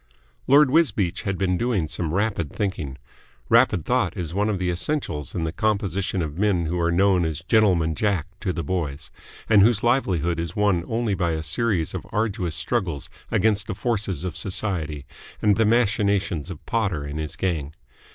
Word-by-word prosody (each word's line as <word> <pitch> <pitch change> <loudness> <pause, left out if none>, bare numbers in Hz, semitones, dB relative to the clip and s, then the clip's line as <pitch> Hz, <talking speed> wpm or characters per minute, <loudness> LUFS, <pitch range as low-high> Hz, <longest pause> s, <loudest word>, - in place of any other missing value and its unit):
Lord 140 0 +6
Wisbeach 110 - +2
had 95 -2 -1
been 90 -1 0
doing 115 -9 0
some 80 +1 -3
rapid 100 -5 -1
thinking. 80 -10 -3 0.5
Rapid - - +4
thought - - 0
is 85 -2 -4
one 105 +3 +1
of 105 - 0
the 90 -1 -1
essentials 85 - -3
in 85 - -1
the 80 - -1
composition 100 -2 -1
of 75 +2 -6
men 100 -5 +2
who 85 +2 -2
are 85 0 +1
known 95 0 +3
as 80 -1 -3
Gentleman 90 -8 +3
Jack 95 -2 0
to 95 -3 -1
the 85 -2 -3
boys 75 -4 -3 0.4
and 105 -3 +6
whose 110 0 +4
livelihood 90 - +1
is 85 0 -4
won 100 -5 +2
only 115 -2 0
by 85 -3 0
a 80 0 -3
series 85 0 0
of - - -6
arduous 100 -6 -1
struggles 90 - -2 0.2
against 105 -1 +2
the 110 - -3
forces 100 - -1
of 90 -3 -4
Society 85 -7 -3 0.3
and 105 -1 +3
the 110 +2 +3
machinations 100 -7 +1
of 90 -5 -9
Potter 100 -10 -1
and 70 +2 -5
his 75 -1 -4
gang. 80 -5 -2
95 Hz, 180 wpm, -24 LUFS, 80-105 Hz, 0.5 s, Lord